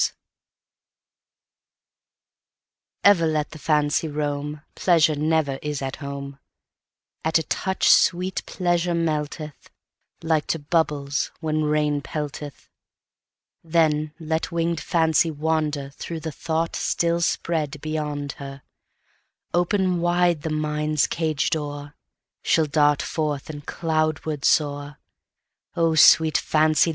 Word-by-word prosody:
Fancy - - -1 2.9
EVER 190 -5 +5
let 155 -1 -1
the 155 - -10
Fancy 150 +1 +1
roam, 150 0 -3
Pleasure 165 -4 +3
never 150 -2 0
is 150 -2 -3
at 135 0 -4
home:At 140 +3 -6
a 160 - -1
touch 190 +4 -1
sweet 180 +1 +3
Pleasure 175 -1 0
melteth, 155 -2 -3 0.5
Like 160 -2 +1
to - - 0
bubbles 145 -2 0
when 155 -1 -1
rain 150 -1 +1
pelteth; 145 0 -6 1.0
Then 155 -2 +1
let 160 0 -2
winged 170 -1 -1
Fancy 165 0 +2
wanderThrough 155 0 -3
the 160 - -3
thought 160 +2 -2
still 170 0 0
spread 155 -3 -1
beyond 150 -2 -3
her:Open 175 +6 -4
wide 175 -2 +2
the 160 - -3
mind's 150 -1 0
cage 160 -3 -1
door, 145 -2 -4 0.5
She'll 160 - +2
dart 145 -1 +2
forth, 150 -2 -3
and 145 -1 -10
cloudward 155 -2 -1
soar.O 150 +3 -2
sweet 160 0 +6
Fancy! 155 +1 +3
155 Hz, 100 wpm, -23 LUFS, 145-165 Hz, 2.9 s, sweet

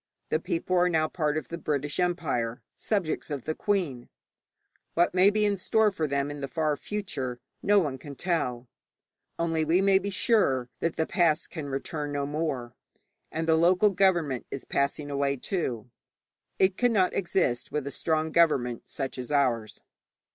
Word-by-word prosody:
The - - +1
people 335 - -2
are 180 0 +4
now 160 -2 +2
part 155 -2 -1
of 155 - -4
the 170 - -5
British 145 0 -2
Empire, 140 -10 -1
subjects 195 -9 -1
of 140 -4 -4
the 155 - -2
Queen. 165 -12 -1 0.9
What 175 +1 +3
may 185 +2 +6
be 210 0 +1
in 205 -1 +1
store 215 +3 +2
for 160 -5 -1
them 140 0 -1
in 145 -1 -7
the 140 - -2
far 150 +2 0
future 140 -9 -4 0.2
no 205 +1 +4
one 145 -9 +1
can 140 +1 -9
tell, 130 -7 -1 0.7
only 165 -1 0
we 165 +4 +3
may 195 0 +4
be 200 +1 -3
sure 180 - +2
that 165 0 -1
the 160 - +1
past 165 -4 +1
can 155 -4 -5
return 145 +2 -3
no 140 -1 -1
more. 140 -5 -3 0.6
And 160 +1 -2
the 160 - +5
local 180 +5 +4
government 175 -9 +1
is 135 - -6
passing 145 +1 -1
away, 140 0 +1
too. 125 - -3 0.7
It 190 0 +3
cannot 220 -7 +3
exist 170 -10 0
with 150 -2 -2
a 140 - -4
strong 160 0 -1
government 135 -9 +2
such 135 -2 -4
as 125 +3 -5
ours. 125 -6 0
155 Hz, 170 wpm, -28 LUFS, 140-180 Hz, 0.9 s, may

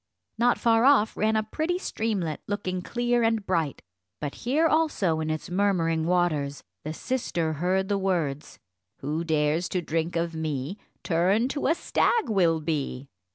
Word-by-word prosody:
Not 240 +1 +4
far 230 -1 +3
off 265 -5 +4
ran 220 +1 +1
a 215 - +2
pretty 315 +11 -2
streamlet, 205 - -2
looking 185 -3 -2
clear 240 +4 0
and 225 -2 +1
bright; 165 -7 -1 0.4
but 145 -2 -4
here 285 +7 +1
also 305 - +2
in 155 0 -2
its 155 +2 -4
murmuring 170 -4 +1
waters, 155 -6 0 0.2
the 155 - -4
sister 170 -6 -2
heard 185 +5 0
the 200 -1 0
words 165 -7 -2 0.4
"Who 150 +4 -2
dares 155 +1 +1
to 180 - -1
drink 165 +2 -2
of 170 0 -1
me, 155 +2 -3 0.2
Turned 195 +9 +2
to 285 - -1
a 325 - +3
stag 465 - +1
will 170 -6 +2
be." 145 -4 -3
180 Hz, 155 wpm, -26 LUFS, 160-220 Hz, 0.4 s, Not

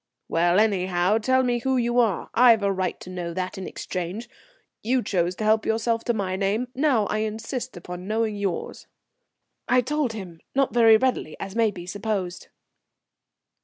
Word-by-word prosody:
"Well, 175 +3 +3
anyhow, 190 -1 +2
tell 260 +4 +2
me 245 -1 +1
who 265 +2 0
you 240 0 +1
are. 220 -7 +1
I've 235 -3 +6
a 200 - +2
right 185 -1 -2
to - - -9
know 175 -2 -5
that 185 +1 -3
in 190 - -5
exchange. 185 +6 -5 0.5
You 250 +2 +1
chose 180 -3 0
to 215 - -5
help 215 +1 +3
yourself 225 +1 0
to 240 - +1
my 190 -3 -2
name; 205 +6 -1
now 260 -6 +2
I 215 - -1
insist 220 +2 -4
upon 180 +1 -8
knowing 220 0 0
yours." 195 -4 -4 0.8
I 250 +1 +4
told 290 -2 -1
him, 180 -6 -8 0.2
not 275 -1 +2
very 225 -2 +7
readily, 250 -9 -1
as 195 +1 -6
may 230 -1 +3
be 180 -4 -8
supposed. 195 -2 -3
215 Hz, 170 wpm, -24 LUFS, 185-235 Hz, 0.8 s, very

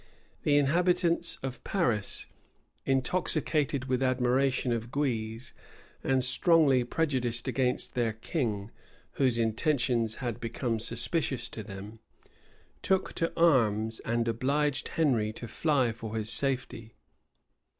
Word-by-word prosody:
The 145 -1 +3
inhabitants 170 +3 +2
of 130 -1 -5
Paris, 120 - 0 0.6
intoxicated 140 0 0
with 130 0 -1
admiration 130 0 +1
of 115 0 -2
Guise, 115 -4 -2 0.5
and 130 -1 +2
strongly 135 -1 +4
prejudiced 125 -4 -1
against 125 -2 0
their 115 -3 0
king, 110 - -3 0.5
whose 130 -3 +3
intentions 115 -1 +1
had 120 -4 -4
become 115 0 -2
suspicious 120 +2 -1
to 110 - -7
them, 105 +1 -9 0.8
took 190 -1 0
to 165 - -1
arms 115 -9 +3
and 115 0 -1
obliged 140 +5 0
Henry 120 -10 +1
to 120 - -8
fly 130 0 +1
for 110 -1 -7
his 110 0 +1
safety. 125 -5 -1
125 Hz, 110 wpm, -29 LUFS, 115-145 Hz, 0.8 s, strongly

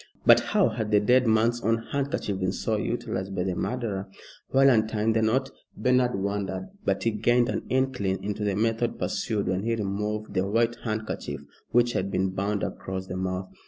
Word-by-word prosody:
But - - +8
how - - +2
had 110 -2 -3
the 105 - +5
dead 125 +4 +4
man's 115 +2 +3
own 115 0 +2
handkerchief 135 -8 -1
been 95 -1 0
so - - -1
utilised 95 +1 -3
by 90 - 0
the 95 0 -1
murderer? 105 -2 -3 0.4
While 135 +1 +5
untying 110 -1 +2
the 110 - +2
knot, 130 +5 +1 0.3
Bernard 125 -2 +2
wondered; 100 - -3
but - - 0
he 115 - +2
gained 120 +3 +2
an - - -3
inkling 130 -8 0
into 105 +1 -3
the 100 -2 0
method 115 +2 0
pursued 105 -3 -1
when 95 0 0
he 115 +2 0
removed 105 +1 -3
the 95 +1 +1
white 115 +3 +2
handkerchief 110 - -4 0.3
which 120 0 +3
had 95 +1 -1
been 95 0 0
bound 100 +1 -1
across 95 0 -4
the 90 - -6
mouth. 95 0 -3
110 Hz, 185 wpm, -26 LUFS, 95-120 Hz, 0.4 s, But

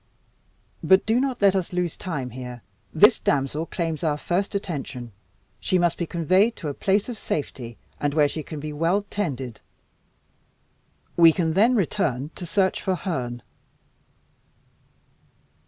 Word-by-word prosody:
But 190 0 +5
do 225 +2 +2
not 260 -5 -1
let 195 -1 +6
us 185 -3 -1
lose 180 -2 -1
time 135 -9 -4
here. 125 -1 -8 0.3
This - - +6
damsel 145 +3 0
claims 165 -2 -3
our 150 -2 +1
first 190 +6 -1
attention. 135 - -4 0.5
She 185 - +1
must 175 -1 +2
be 170 - -3
conveyed 185 +7 +2
to 155 - -5
a - - -3
place 195 +6 +1
of 240 -3 -6
safety, 120 -6 -4 0.2
and 145 0 -1
where 150 -2 +5
she 155 +2 -4
can 155 +1 -7
be 150 +1 -5
well 170 +7 +1
tended. 135 - -3 1.5
We 165 -1 +8
can 160 -1 0
then 225 +8 +4
return 155 - 0
to 175 - -7
search 190 +1 +1
for 190 - 0
Herne." 125 -10 -4
165 Hz, 145 wpm, -24 LUFS, 145-190 Hz, 1.5 s, We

